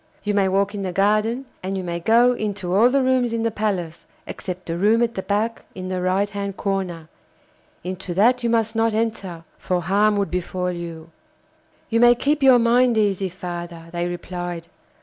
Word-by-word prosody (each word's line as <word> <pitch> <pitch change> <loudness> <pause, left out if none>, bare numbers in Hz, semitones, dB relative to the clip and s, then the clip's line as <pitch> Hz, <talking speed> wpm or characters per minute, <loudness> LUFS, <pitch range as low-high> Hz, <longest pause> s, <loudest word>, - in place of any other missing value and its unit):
You 205 - -1
may 200 -1 +3
walk 200 +2 +1
in 205 - -4
the 190 -2 -3
garden, 215 +7 +1 0.2
and 190 +1 -3
you 190 - -3
may 170 -1 -3
go 235 +7 +4
into 205 -6 -3
all 220 +6 +5
the 270 +1 +2
rooms 255 -2 +2
in 230 0 -1
the 230 - +1
palace, 190 -6 -3 0.2
except 180 -1 -7
the 165 - -3
room 215 +6 +3
at 235 0 -1
the 190 - -3
back 215 +4 -1
in 185 0 -6
the 185 -1 -2
right 185 +3 +1
hand 200 -1 -5
corner; 185 -5 -3 0.8
into 185 0 -5
that 245 +6 +4
you 235 - +1
must 225 -1 +1
not 225 -1 +1
enter, 200 -7 -3 0.2
for 180 -1 -1
harm 205 +4 +2
would 200 -1 -1
befall 180 0 -2
you.' 165 -2 -7 0.8
'You 230 - +3
may 240 0 +7
keep 290 +4 0
your 265 -2 +7
mind 240 0 +3
easy, 195 -3 +1
father,' 175 -2 -7
they 175 0 -2
replied. 175 -1 -5
200 Hz, 190 wpm, -22 LUFS, 180-225 Hz, 0.8 s, may